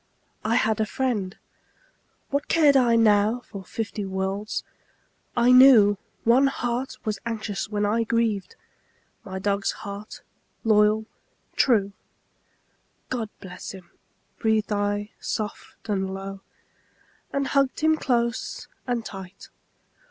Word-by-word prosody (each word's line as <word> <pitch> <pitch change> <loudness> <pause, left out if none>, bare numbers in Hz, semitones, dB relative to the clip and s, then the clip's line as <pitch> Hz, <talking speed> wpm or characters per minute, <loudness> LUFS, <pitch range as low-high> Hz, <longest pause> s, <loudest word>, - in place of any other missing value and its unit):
I 225 +2 +1
had 220 -1 +2
a 220 - +2
friend; 215 -7 -2 0.9
what 280 +1 -1
cared 300 -4 +5
I 245 -3 +5
now 215 +1 +4
For 200 -5 -9
fifty 215 +2 -4
worlds? 190 +2 -3 0.7
I 240 +1 +5
knew 240 -6 +7 0.2
One 250 +4 +5
heart 250 -1 -2
was 215 -1 -2
anxious 215 -4 -3
when 210 -1 0
I 225 +3 +1
grieved 230 - 0 0.7
My 190 -1 -6
dog's 200 +1 0
heart, 200 +1 -7 0.4
loyal, 215 -1 +4 0.5
true. 205 -6 +3 1.2
"God 235 -4 -2
bless 180 0 -8
him," 185 -3 -13 0.5
breathed 220 -2 +1
I 205 +1 -1
soft 215 +1 -5
and 190 -2 -1
low, 195 0 -6 0.9
And 275 0 0
hugged 275 -1 +1
him 315 0 +4
close 235 -6 -1 0.2
and 240 -2 -1
tight. 190 -1 -9
215 Hz, 115 wpm, -25 LUFS, 200-240 Hz, 1.2 s, knew